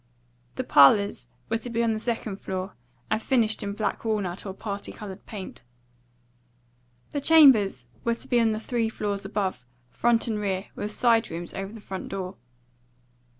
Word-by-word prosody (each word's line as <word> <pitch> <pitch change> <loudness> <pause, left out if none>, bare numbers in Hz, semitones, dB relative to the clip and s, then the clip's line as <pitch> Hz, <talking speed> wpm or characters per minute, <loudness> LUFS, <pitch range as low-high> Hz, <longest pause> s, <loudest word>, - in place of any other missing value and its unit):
The - - -2
parlours 145 0 +5 0.2
were 225 - 0
to 245 - -6
be 230 0 0
on 230 -1 +2
the 215 - -2
second 225 -3 -2
floor, 190 0 -4 0.4
and 220 0 +1
finished 225 -5 +1
in 200 -1 -3
black 215 +1 -2
walnut 205 -4 -2
or 190 - -4
party 200 -1 -5
coloured 200 -2 -9
paint. 200 -4 -8 1.5
The 285 - -2
chambers 255 - +6 0.2
were 235 - +1
to 265 - -12
be 245 -2 +3
on 225 -1 +3
the 215 - -2
three 230 0 -1
floors 205 -2 -3
above, 195 -8 -2 0.3
front 235 - +2
and 220 -2 -1
rear, 195 -1 -2
with 210 - -4
side 230 0 +3
rooms 170 +1 -6
over 195 +1 -5
the 225 - -10
front 190 -2 -6
door. 190 -1 -5
210 Hz, 170 wpm, -26 LUFS, 195-230 Hz, 1.5 s, chambers